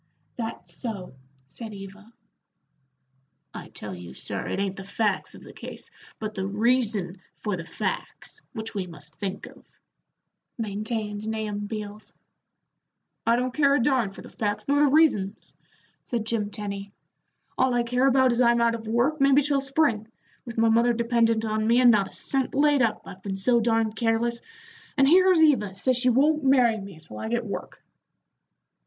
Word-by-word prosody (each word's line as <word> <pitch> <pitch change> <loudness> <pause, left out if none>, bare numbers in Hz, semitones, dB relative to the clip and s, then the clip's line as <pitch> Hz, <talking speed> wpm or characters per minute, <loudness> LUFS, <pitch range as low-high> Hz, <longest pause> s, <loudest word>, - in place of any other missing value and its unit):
"That's 225 -7 -6
so," 195 - -6 0.3
said 215 - -9
Eva. 195 +3 -11 1.4
"I - - -8
tell 105 -2 -7
you, 90 -6 -10
sir, - - -3
it - - -2
ain't 195 -1 -1
the 195 - -6
facts 205 0 -1
of - - -13
the - - -12
case, - - -9 0.3
but 215 -1 -5
the 190 -1 -3
reason 210 -4 0 0.2
for 210 -3 -2
the 170 -2 -7
facts, - - -4
which 225 -2 -5
we 195 -3 -3
must 150 -3 -8
think 195 +3 -5
of," - - -15 0.9
maintained 215 -1 -3
Nahum 210 -2 -3
Beals. 210 -1 -6 1.1
"I 230 - +5
don't 250 +1 -1
care 280 -1 +4
a - - +2
darn 255 -4 +2
for - - -12
the - - -12
facts 205 -2 -3
nor 285 +1 +3
the 295 - +5
reasons," 240 -11 +2 0.5
said 235 -3 -3
Jim 220 -2 -1
Tenny; 200 -1 -6 0.6
"all 260 -1 +2
I 240 - +2
care 250 +3 +2
about 260 -1 +4
is 235 +1 +1
I'm 235 -1 +4
out 235 0 +3
of 225 -1 -6
work 250 +7 +1
maybe 275 +1 +5
till 280 -1 +1
spring, 275 -6 +1 0.4
with 235 -2 -8
my 225 0 +4
mother 235 +2 +4
dependent 230 -1 +2
on 215 0 0
me, 235 +2 +4
and 245 -1 +7
not 200 -3 +2
a - - -16
cent 270 -1 -1
laid 290 -1 +4
up, 225 -3 +1
I've 190 -1 -11
been 195 0 -4
so 235 +5 +3
darned 225 -1 +1
careless, 235 +1 0 0.6
and 270 -1 +5
here's 365 +1 +6
Eva 215 -11 +3
says 255 +6 +2
she 250 +1 +2
won't 295 +5 +3
marry 250 -5 +4
me 195 -4 -10
till 130 -9 -11
I - - -4
get 235 0 -1
work." 200 - -7
225 Hz, 175 wpm, -26 LUFS, 205-250 Hz, 1.4 s, and